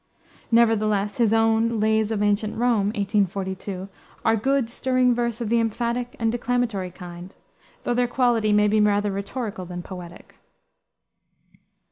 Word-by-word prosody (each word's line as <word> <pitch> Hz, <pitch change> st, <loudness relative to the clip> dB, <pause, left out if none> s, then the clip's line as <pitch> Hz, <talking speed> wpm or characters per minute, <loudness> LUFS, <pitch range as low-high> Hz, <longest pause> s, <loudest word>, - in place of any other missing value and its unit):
Nevertheless 215 Hz, -3 st, +2 dB
his 230 Hz, -3 st, +3 dB
own 225 Hz, 0 st, +2 dB
Lays 220 Hz, 0 st, +2 dB
of 210 Hz, -2 st, -1 dB
Ancient 210 Hz, +1 st, 0 dB
Rome, 230 Hz, -4 st, +2 dB
1842, 195 Hz, -2 st, -2 dB, 0.4 s
are 225 Hz, -, +4 dB
good, 265 Hz, +3 st, +1 dB
stirring 255 Hz, +1 st, +1 dB
verse 235 Hz, -1 st, -2 dB
of 225 Hz, -, -2 dB
the 235 Hz, +1 st, +3 dB
emphatic 235 Hz, +2 st, -2 dB
and 225 Hz, -1 st, 0 dB
declamatory 240 Hz, -5 st, -1 dB
kind, 180 Hz, +1 st, -10 dB, 0.5 s
though 245 Hz, -, 0 dB
their 245 Hz, 0 st, +2 dB
quality 240 Hz, -4 st, +2 dB
may 210 Hz, 0 st, +4 dB
be 215 Hz, +1 st, +3 dB
rather 205 Hz, 0 st, +2 dB
rhetorical 200 Hz, 0 st, -4 dB
than 175 Hz, 0 st, -7 dB
poetic. 175 Hz, -2 st, -11 dB
220 Hz, 135 wpm, -24 LUFS, 200-235 Hz, 0.5 s, are